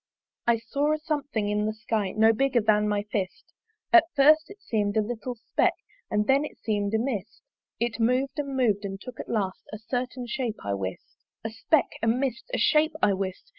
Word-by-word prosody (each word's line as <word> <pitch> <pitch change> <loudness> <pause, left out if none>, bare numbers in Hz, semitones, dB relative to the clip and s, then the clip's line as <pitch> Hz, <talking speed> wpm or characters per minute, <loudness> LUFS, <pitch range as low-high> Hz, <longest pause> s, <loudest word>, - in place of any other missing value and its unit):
I 235 -1 +4
saw 280 +7 0
a - - 0
something 290 -8 -2
in 210 +1 0
the 215 - -2
Sky 215 -3 -2
No 220 +1 +5
bigger 265 +1 +2
than 210 0 +3
my 205 0 0
fist; 200 - -4 0.4
At 350 -2 +8
first 305 +3 +5
it 405 +1 -12
seem'd 215 - -1
a - - +5
little 240 +3 -4
speck 235 - +1 0.3
And 210 0 +1
then 270 +4 +3
it 300 - -7
seem'd 205 -1 -1
a - - +4
mist: 220 -4 -3 0.4
It 235 0 -1
mov'd 260 +5 +1
and 280 -2 -3
mov'd, 215 -5 +2
and 195 -1 -5
took 250 +3 -10
at - - -7
last 195 -5 -1
A 215 - -5
certain 245 +3 -3
shape, 240 -2 -3
I 100 - 0
wist. 95 -1 -5 0.3
A 225 - -3
speck, 285 +7 +2
a 230 - 0
mist, 250 - 0
a - - 0
shape, 310 0 +3
I 200 - +5
wist! 190 -1 -3
230 Hz, 205 wpm, -27 LUFS, 210-275 Hz, 0.4 s, At